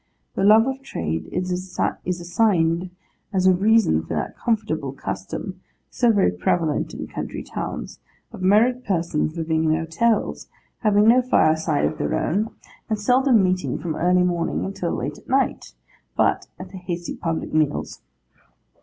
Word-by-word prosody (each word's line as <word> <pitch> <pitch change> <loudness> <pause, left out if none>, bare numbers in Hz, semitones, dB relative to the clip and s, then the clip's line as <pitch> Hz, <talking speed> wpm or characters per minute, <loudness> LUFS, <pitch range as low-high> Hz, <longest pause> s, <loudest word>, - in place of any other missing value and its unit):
The - - -1
love 215 +3 +7
of 265 0 -3
trade 80 - -4
is 180 0 -2 0.6
assigned 175 -1 +1 0.4
as 185 -2 +1
a 185 - +7
reason 205 - +3
for 80 +1 -5
that 75 - -3
comfortless 160 - -2
custom, 95 - -5 0.3
so 240 -2 +3
very 200 - +3
prevalent 150 - -1
in - - -5
country - - -6
towns, - - -6 0.3
of - - -10
married 230 +7 +3
persons 170 -4 -1
living 160 -1 0
in 155 0 +3
hotels, 165 +8 0 0.3
having 210 -1 +3
no 245 +3 +6
fireside 160 -10 +2
of 155 - -2
their - - -1
own, 210 +6 0 0.4
and 215 - 0
seldom 250 0 +4
meeting 185 0 0
from 165 -3 -4
early 180 +1 +3
morning 175 -2 -1
until 190 -3 -3
late 145 +1 -3
at - - -21
night, 270 +1 0 0.4
but - - +2
at 185 0 -9
the 195 - -8
hasty 175 -1 -5
public 165 -2 -3
meals. 155 -2 0
180 Hz, 150 wpm, -23 LUFS, 160-215 Hz, 0.6 s, love